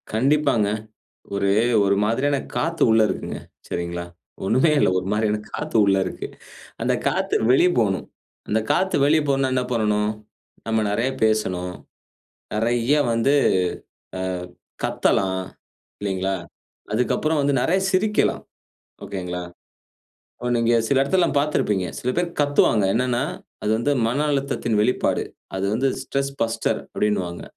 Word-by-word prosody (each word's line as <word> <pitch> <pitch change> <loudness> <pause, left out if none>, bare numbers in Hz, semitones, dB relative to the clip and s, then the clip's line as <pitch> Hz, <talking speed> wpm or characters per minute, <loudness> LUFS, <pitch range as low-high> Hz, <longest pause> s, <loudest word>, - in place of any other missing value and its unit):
கண்டிப்பாங்க. 135 -3 +2 0.7
ஒரு, 100 0 +1 0.4
ஒரு 100 0 +3
மாதிரியான 135 +6 +1 0.2
காத்து 165 +1 0
உள்ள 110 0 +5
இருக்குங்க. 95 - -4 0.3
சரிங்களா? 85 0 -3 0.4
ஒண்ணுமே 130 +10 +3
இல்ல, - - +4
ஒரு 90 - -8
மாரியான 105 0 +1 0.2
காத்து 150 -2 -5
உள்ள 95 -1 +3
இருக்கு. 90 - -5 0.5
அந்த - - +1
காத்து - - 0 0.2
வெளிய 175 +8 +5
போணும். 95 -4 0 0.4
அந்த 110 - +2
காத்து 190 +1 +1
வெளிய 155 +2 +4
போணும்னா 135 -1 +1
என்ன 125 -1 +1
பண்ணணும்? 105 -2 +1 0.6
நம்ம 110 -1 +1
நெறய 115 +5 +1
பேசணும். 95 -5 0 0.8
நெறய 120 +6 +2
வந்து, 115 +5 +2 0.8
ஆ - - -4 0.6
கத்தலாம். 95 -1 +1 0.6
இல்லிங்களா? 95 -1 -1 0.6
அதுக்கப்புறம் 145 +7 +1
வந்து 140 0 +1
நெறய 180 +8 +2
சிரிக்கலாம். 210 +3 +1 0.6
ஓகேங்களா. 90 -2 -4 0.9
இப்ப 125 - -4
நீங்க 115 0 +2
சில 140 - +2
இடத்துலலாம் 170 +2 +2
பாத்திருப்பீங்க, 105 -10 0
சில 125 - -2
பேர் 175 0 +2
கத்துவாங்க. 145 -7 +3
என்னான்னா 125 +1 +1 0.4
அது 105 - +1
வந்து 120 +6 0 0.2
மன 125 +5 -1
அழுத்தத்தின் 135 -5 -1
வெளிப்பாடு. 125 +4 +1 0.3
அது 95 +1 -1
வந்து 130 +5 +1
"ஸ்ட்ரெஸ் 140 0 -2
பஸ்டர்" 115 0 0
அப்டின்னுவாங்க. 95 -5 -1
115 Hz, 125 wpm, -23 LUFS, 105-140 Hz, 0.9 s, உள்ள